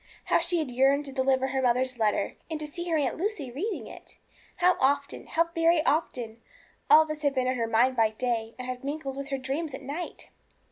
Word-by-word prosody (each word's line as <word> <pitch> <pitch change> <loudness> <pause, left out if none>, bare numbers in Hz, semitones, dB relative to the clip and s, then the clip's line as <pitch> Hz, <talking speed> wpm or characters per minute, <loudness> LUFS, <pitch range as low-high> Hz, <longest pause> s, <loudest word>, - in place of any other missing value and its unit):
How - - +3
she 340 +1 0
had 305 -6 -2
yearned 270 +3 +3
to 275 - -7
deliver 265 0 +1
her 265 0 0
mother's 255 0 +1
letter, 210 -2 +1 0.2
and 320 -2 -3
to 305 - -4
see 345 +4 -5
her 325 - +2
Aunt 280 -4 0
Lucy 340 - -3
reading 380 - -3
it! - - -13 0.4
How 360 +1 +4
often 280 +1 0
how 335 +1 +1
very 330 -1 +3
often, 240 -7 -1 0.5
all 315 +1 +8
this 305 -1 -5
had 285 -2 +1
been 255 -1 +1
in 255 - +1
her 230 -2 -1
mind 240 +3 +3
by 225 -2 +4
day, 225 0 -2
and 255 - -6
had 255 0 -5
mingled 275 -1 -4
with 275 0 -6
her 275 - -1
dreams 270 +3 -3
at 275 - -10
night! 295 +6 -6
275 Hz, 220 wpm, -28 LUFS, 255-315 Hz, 0.5 s, all